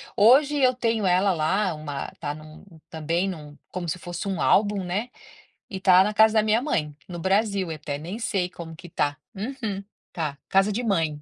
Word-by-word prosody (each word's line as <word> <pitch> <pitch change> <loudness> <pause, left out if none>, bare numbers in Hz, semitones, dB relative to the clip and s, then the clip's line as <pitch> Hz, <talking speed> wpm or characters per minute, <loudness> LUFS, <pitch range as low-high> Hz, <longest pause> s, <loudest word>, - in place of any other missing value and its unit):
Hoje 265 +7 +5
eu 255 -2 +4
tenho 230 -4 0
ela 185 +2 +3
lá 180 +4 +1
uma 145 -2 -5
tá 145 - -2
num 155 +1 -13 0.3
também 165 +4 -1
num 150 -4 -8
como 175 -2 -4
se 180 - -3
fosse 175 +3 -6
um 190 - -2
álbum, 205 -1 +3
né. 205 +8 -2 0.6
E 190 - -5
tá 185 0 +6
na 210 - -1
casa 220 +1 +5
da 215 - +5
minha 215 +2 +2
mãe, 150 - -1
no 175 -1 -7
Brasil, 195 0 +1
eu - - -3
até 145 -1 -5
nem 175 +9 -6
sei 195 -6 -1
como 165 -2 -9
que 175 - -12
tá. 145 -3 -1 0.2
Uhum. 215 -2 -4 0.3
Tá. 150 -4 -3
Casa 195 +2 +3
de 230 +5 -2
mãe. 165 -9 0
190 Hz, 200 wpm, -25 LUFS, 160-210 Hz, 0.6 s, tá